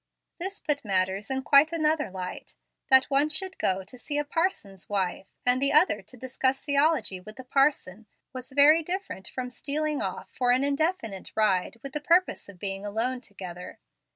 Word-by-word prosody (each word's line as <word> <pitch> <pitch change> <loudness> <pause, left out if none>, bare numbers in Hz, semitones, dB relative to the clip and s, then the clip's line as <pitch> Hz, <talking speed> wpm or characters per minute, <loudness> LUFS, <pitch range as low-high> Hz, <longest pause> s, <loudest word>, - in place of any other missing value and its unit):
This 385 +4 -3
put 290 -2 -2
matters 190 +1 -1
in 265 0 -2
quite 285 +4 +6
another 310 -4 +1
light. 185 -1 -7 0.3
That 265 0 +7
one 280 +2 +3
should 375 +5 0
go 190 0 0
to 250 +7 -13
see 290 +3 -4
a 295 - 0
parson's 290 - -2
wife, 190 -1 -2 0.2
and 250 +1 +3
the 275 - +3
other 310 +5 +4
to 250 - -12
discuss 260 +2 -1
theology 285 - +2
with 215 +4 -12
the 260 - -10
parson, 255 -7 0 0.3
was 255 +1 -7
very 290 +4 +6
different 355 - -5
from 250 -1 -5
stealing 300 +3 -2
off - - -5
for 250 -1 -1
an 255 +2 +2
indefinite 280 - -2
ride 210 0 +1
with 275 -1 -7
the 300 - -3
purpose 345 - +2
of 200 - -12
being 195 +1 -5
alone 230 +5 -2
together. 185 -5 -9
260 Hz, 180 wpm, -27 LUFS, 200-300 Hz, 0.3 s, That